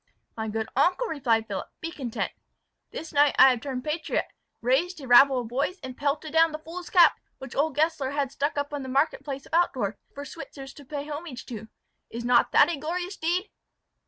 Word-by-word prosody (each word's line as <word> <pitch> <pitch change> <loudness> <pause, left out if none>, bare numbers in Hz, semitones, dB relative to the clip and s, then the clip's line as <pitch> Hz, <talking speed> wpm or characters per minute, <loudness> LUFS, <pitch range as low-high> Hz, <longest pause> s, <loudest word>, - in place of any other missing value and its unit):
"My 220 -1 -3
good 220 +1 -2
uncle," 360 - +3
replied 240 - +1
Philip, 200 -3 -4
"be 330 - -5
content. 255 -8 -3 0.6
This 320 - -8
night 290 0 +4
I 265 - +9
have 245 -2 -2
turned 260 -3 -4
patriot, 310 +1 -1 0.3
raised 285 +9 +1
a 270 - -9
rabble 260 +1 +7
of 235 - -7
boys, 280 +10 -1
and 260 -1 -6
pelted 295 +3 -2
down 325 0 +5
the 310 - -4
fool's 335 +3 -9
cap 350 -3 +6 0.2
which 265 -1 -9
old 295 +1 +1
Gessler 300 -3 +1
had 280 -1 -1
stuck 285 +2 -2
up 285 +1 -2
in 290 - -3
the 260 - -6
market 275 +5 +1
place 275 -2 -6
of - - -18
Altdorf, 260 - +1 0.2
for 285 +1 -6
Switzers 275 -4 -9
to 285 - -12
pay 290 +1 -5
homage 295 -4 -7
to. 220 -3 -8 0.4
Is 235 +1 -6
not 240 -1 +4
that - - +6
a 340 -3 -2
glorious 355 +5 -3
deed!" 355 +5 -1
285 Hz, 205 wpm, -26 LUFS, 255-320 Hz, 0.6 s, I